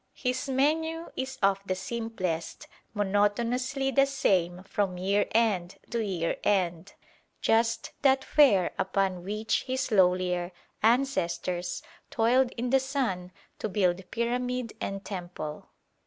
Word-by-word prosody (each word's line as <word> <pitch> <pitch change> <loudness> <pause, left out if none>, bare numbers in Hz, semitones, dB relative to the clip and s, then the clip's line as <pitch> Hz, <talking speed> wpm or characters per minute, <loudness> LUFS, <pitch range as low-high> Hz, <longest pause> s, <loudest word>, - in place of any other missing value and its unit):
His 255 +2 -2
menu 320 +5 0
is 265 0 -4
of 195 0 +3
the 185 -1 -2
simplest, 185 -7 -4 0.3
monotonously 235 +7 +1
the 275 +2 +4
same 185 -10 +1
from 195 -2 -1
year 200 +3 +1
end 205 -6 +1
to 230 -1 0
year 180 -5 -1
end; 180 -2 0 0.5
just 225 0 +1
that 270 -1 +4
fare 210 -12 +4
upon 190 -2 0
which 210 +3 -1
his 260 0 -1
lowlier 180 -2 +2 0.3
ancestors 205 - 0 0.3
toiled 245 +3 +3
in 245 +1 -3
the 270 - +5
sun 255 -10 -2 0.3
to 220 - -2
build 185 -2 0
pyramid 245 0 -2
and 195 0 -4
temple. 175 -5 -6
210 Hz, 120 wpm, -28 LUFS, 185-255 Hz, 0.5 s, the